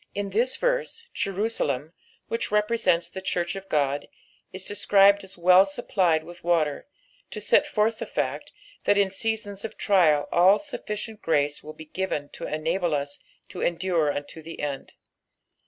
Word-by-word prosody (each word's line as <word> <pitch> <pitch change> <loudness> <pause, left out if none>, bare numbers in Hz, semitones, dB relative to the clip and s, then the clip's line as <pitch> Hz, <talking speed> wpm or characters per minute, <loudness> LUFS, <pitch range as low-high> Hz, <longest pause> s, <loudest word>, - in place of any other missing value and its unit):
In 200 -1 -3
this 240 +6 +1
verse, - - -1
Jerusalem, 180 - -1 0.3
which 230 - -2
represents 210 -5 +2
the 190 +2 -8
church 175 -2 -1
of 195 0 -8
God, 145 -1 0 0.4
is 185 0 -5
described 200 0 +4
as 190 -1 -8
well 180 +2 +7
supplied 190 -5 0
with 175 +2 -12
wster, 165 -4 +1 0.4
to - - -6
set - - +3
forth 220 +1 +1
the - - -4
fact, - - -3 0.3
that 205 - +4
in 200 -1 +3
seasons 205 -1 -2
of 225 - -6
trial 165 -8 +3
all 185 +4 +6
sufficient 220 -6 -6
grace 145 -2 0
will 155 - -8
be 155 - -11
given 155 -4 -3
to - - -7
enable 165 +2 -1
us 145 0 -4 0.3
to - - -7
endure 170 -3 +1
unto 145 +3 -6
the 165 +1 -10
end. 145 -2 -4
185 Hz, 155 wpm, -26 LUFS, 155-205 Hz, 0.4 s, well